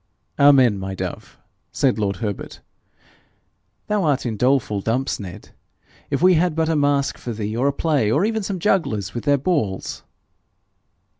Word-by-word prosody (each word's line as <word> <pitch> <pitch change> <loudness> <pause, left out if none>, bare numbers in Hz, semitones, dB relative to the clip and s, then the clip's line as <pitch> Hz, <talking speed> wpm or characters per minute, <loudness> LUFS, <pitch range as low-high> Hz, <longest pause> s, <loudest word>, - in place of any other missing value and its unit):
'Amen, 130 -7 +5
my 95 0 -5
dove!'said 130 +5 -4
lord 100 -2 0
Herbert. 100 +1 -5 1.3
'Thou 210 -2 0
art 145 -5 +1
in 115 -3 -2
doleful 125 -3 +1
dumps, 125 +6 -1
Ned. 95 -4 -9 0.6
If - - -1
we 185 0 +7
had 170 -1 +1
but 160 0 0
a 165 - +1
masque 145 -1 +1
for 120 - -5
thee, 105 0 -4
or 125 +4 +1
a - - +3
play, 140 -6 0
or 150 - +2
even 220 0 -1
some 195 -1 -3
jugglers 115 - 0
with 120 - -5
their 145 -1 +4
balls!' 130 - -2
135 Hz, 155 wpm, -21 LUFS, 105-160 Hz, 1.3 s, we